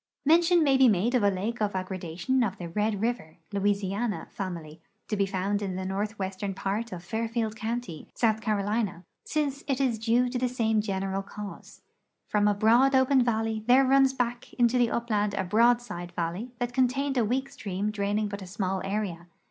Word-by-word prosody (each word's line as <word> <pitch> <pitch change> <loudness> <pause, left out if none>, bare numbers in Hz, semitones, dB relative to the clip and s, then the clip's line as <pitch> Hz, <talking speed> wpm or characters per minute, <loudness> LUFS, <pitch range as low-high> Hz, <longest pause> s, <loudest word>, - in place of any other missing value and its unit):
Mention 335 +2 +5
may 275 -3 +4
be 265 -1 +6
made 215 +4 +1
of 250 - +3
a 205 - +4
lake 210 +5 -3
of 205 -2 0
aggradation 185 +6 -2
of 195 -5 -2
the 175 - -6
Red 210 +2 -1
river 225 -10 -2 0.2
(Louisiana) 200 +2 -1
fatnily, 170 -5 -6 0.3
to 215 - 0
be 200 -1 +1
found 195 +2 -1
in 190 -2 -3
the 185 0 -4
northwestern 195 0 -3
part 210 +5 -2
of 175 -1 -7
Fairfield 225 +2 -2
county, 220 -6 -5
S. 220 -2 +3
C, 210 +1 0 0.4
since 290 -2 -1
it 270 -2 0
is 250 -5 +1
due 235 +3 +2
to 250 0 -2
the 250 0 +1
same 225 -3 +1
general 195 -1 -2
cause. 205 +1 -10 0.4
From 210 -1 +2
a 205 - +3
broad 235 +6 +4
open 260 0 +4
valley 225 -2 -1
there 260 +2 +6
runs 270 0 +5
back 245 -2 -3
into 240 0 +3
the 240 -1 +3
upland 210 -4 0
a 190 - 0
broad 230 +6 +4
side 175 -6 -7
valley 175 +8 -3
that 245 0 -3
contained 265 +2 +1
a 245 - +3
weak 260 +5 0
stream 200 +1 -3
draining 205 +1 -1
but 200 0 -6
a 190 - -8
small 190 0 -2
area. 195 -4 -3
215 Hz, 190 wpm, -27 LUFS, 195-245 Hz, 0.4 s, be